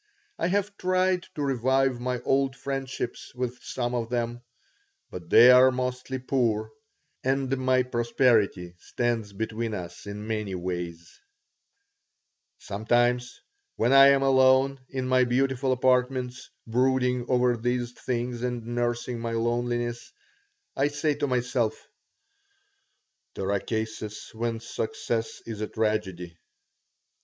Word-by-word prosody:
I - - +1
have 200 +2 0
tried 185 0 +1
to 150 - -2
revive 130 -1 +1
my 125 0 -2
old 135 0 +1
friendships 135 -3 -5
with 125 0 -3
some 120 -1 -3
of 115 -2 -2
them, 120 0 -2 0.7
but 85 -2 -8
they 125 +2 +9
are 130 +1 +8
mostly 125 +1 -3
poor 115 -4 0 0.5
and 135 0 +1
my 130 0 +3
prosperity 115 -7 +1
stands 115 -2 -2
between 110 +2 -3
us 90 0 -8
in 105 +1 -6
many 105 -3 -3
ways 85 -2 -5 1.4
Sometimes 120 +4 0 0.3
when 120 +4 +2
I 135 0 +9
am 140 0 +4
alone 135 0 +4
in 130 -1 -3
my 130 0 +4
beautiful 130 +1 +1
apartments, 125 0 +1 0.2
brooding 125 +1 +1
over 125 -1 +3
these 120 +1 -1
things 120 -1 -3
and 120 -2 -3
nursing 120 0 -2
my 115 0 -3
loneliness, 120 +1 -1 0.6
I 140 - +2
say 145 +1 0
to 145 0 -2
myself: 125 -3 0 1.6
"There 95 +1 -2
are 100 - +1
cases 110 0 -5
when 115 0 -3
success 115 0 -3
is 110 -2 -6
a 110 - -1
tragedy." 95 -7 -2
120 Hz, 120 wpm, -27 LUFS, 115-130 Hz, 1.6 s, they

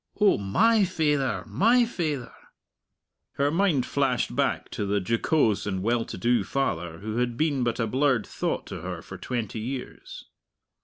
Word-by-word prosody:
Oh, 210 - +4
my 210 - +3
faither, 150 -7 0
my 235 +4 +3
faither!" 155 - -3 1.0
Her 140 +1 +1
mind 165 -7 +2
flashed 135 -3 0
back - - 0
to 100 - -3
the 100 +1 +1
jocose 115 - +1
and 95 -2 -2
well 115 +1 +1
to - - -7
do 120 -2 +2
father 85 -10 -2
who 110 +4 -5
had 120 -1 0
been 145 -5 +1
but 120 -1 -1
a 115 - +2
blurred 130 -1 +1
thought - - -3
to - - -7
her - - -6
for - - -9
twenty 115 -3 -3
years. 135 - -7
125 Hz, 160 wpm, -26 LUFS, 110-155 Hz, 1.0 s, Oh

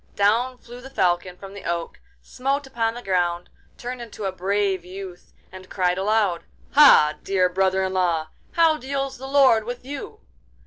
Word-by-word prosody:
Down 230 +5 +2
flew 245 0 -12
the 265 - -10
Falcon 180 -6 0
from 195 0 -11
the 200 - -10
oak, 170 0 -4 0.2
smote 275 +2 -2
upon 230 -3 -2
the 240 - -8
ground, 175 -2 -1 0.3
turned 245 0 -6
into 220 -3 -7
a 190 - -1
brave 190 0 -1
youth, 185 0 -10 0.2
and 185 0 -12
cried 180 -1 0
aloud: 200 -3 +1 0.3
'Ha, 270 - +6
dear 190 -2 +2
brother 190 +1 +1
in 190 0 -2
law! 170 -4 0 0.2
how 330 -2 +4
deals 275 -1 -4
the 265 - -7
Lord 270 -5 +4
with 245 +2 -7
you? 290 +10 -7
200 Hz, 170 wpm, -23 LUFS, 185-255 Hz, 0.3 s, Ha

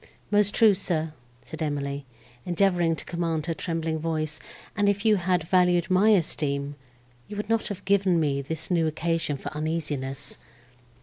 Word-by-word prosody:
"Most 205 0 +3
true, 220 -3 +6
sir," 160 -5 -1 0.3
replied 160 0 -6
Emily, 140 -1 -3 0.4
endeavouring 175 -2 +2
to - - -5
command 165 -3 -2
her 170 - -1
trembling 165 -1 -2
voice; 155 -1 -2 0.4
"and 205 -1 +3
if 200 +2 -1
you 215 -2 +5
had 180 -2 +1
valued 180 +1 +2
my 190 +4 +5
esteem, 145 -7 +1 0.5
you 210 - -7
would 210 +1 -4
not 225 -1 +1
have 205 - -6
given 195 -3 +3
me 140 -3 0
this 160 +5 -4
new 165 -2 +3
occasion 165 -1 -1
for - - -6
uneasiness." 150 -4 -2
165 Hz, 160 wpm, -26 LUFS, 155-190 Hz, 0.5 s, true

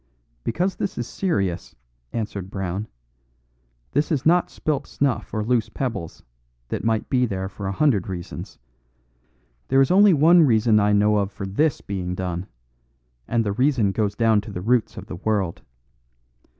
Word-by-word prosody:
"Because 180 +11 -1
this 195 - -3
is 120 - -3
serious," 95 - -2 0.4
answered 105 -4 -4
Brown; 95 +2 -3 1.0
"this 145 +4 0
is 140 -4 0
not 175 +2 +4
spilt 150 -3 -2
snuff 140 -3 -1
or 110 -1 -1
loose 120 0 +1
pebbles, 110 -11 -4 0.5
that - - -3
might 110 -1 0
be 125 -2 +2
there 95 -2 -3
for 95 0 -6
a - - -1
hundred 105 - +2
reasons. 90 -2 -7 1.1
There 135 - +3
is 135 +4 +4
only 195 -1 +6
one 165 +4 +6
reason 115 -6 +4
I 105 0 +3
know 105 +1 +3
of 100 -1 0
for 100 - -6
this 140 +10 0
being 90 -2 -4
done; 90 0 -4 0.8
and 115 -1 +1
the 100 - 0
reason 125 -4 +2
goes 105 0 -1
down 110 -2 +3
to 105 - -9
the 90 - -5
roots 120 +3 +1
of - - -7
the 90 - -7
world. 100 -3 -1
110 Hz, 165 wpm, -23 LUFS, 95-135 Hz, 1.1 s, only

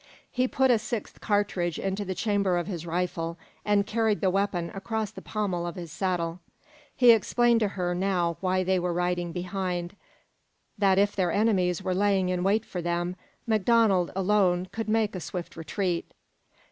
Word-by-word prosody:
He 255 0 +1
put 265 0 +3
a 235 - +4
sixth 220 -1 -5
cartridge 200 -5 0
into 195 +1 -2
the 190 -1 -4
chamber 200 -3 +1
of 175 - -1
his 175 -3 -5
rifle, 170 -1 -2 0.3
and 205 -1 +2
carried 220 -1 +1
the 190 - +2
weapon 190 -3 -1
across 215 +1 -3
the - - -10
pommel 185 -5 -2
of 175 - -5
his 170 -4 -7
saddle. 175 -1 -2 0.6
He 245 -2 +7
explained 235 +1 +3
to 215 - +2
her 180 -1 0
now 175 -2 0
why 185 0 +1
they 185 0 +1
were 175 0 -1
riding 175 0 -1
behind 180 0 -3 0.8
that 195 -3 +3
if 200 +1 +3
their 180 -3 +1
enemies 190 -4 +1
were 185 -1 0
laying 195 -1 +2
in 180 -1 0
wait 205 +4 +2
for 180 - -5
them, 175 +1 -1 0.3
MacDonald, 215 -4 +3
alone, 190 -2 +2
could 225 -1 -4
make 220 -1 +1
a 185 - -4
swift 175 +2 -6
retreat. 170 +2 -2
190 Hz, 170 wpm, -27 LUFS, 175-210 Hz, 0.8 s, He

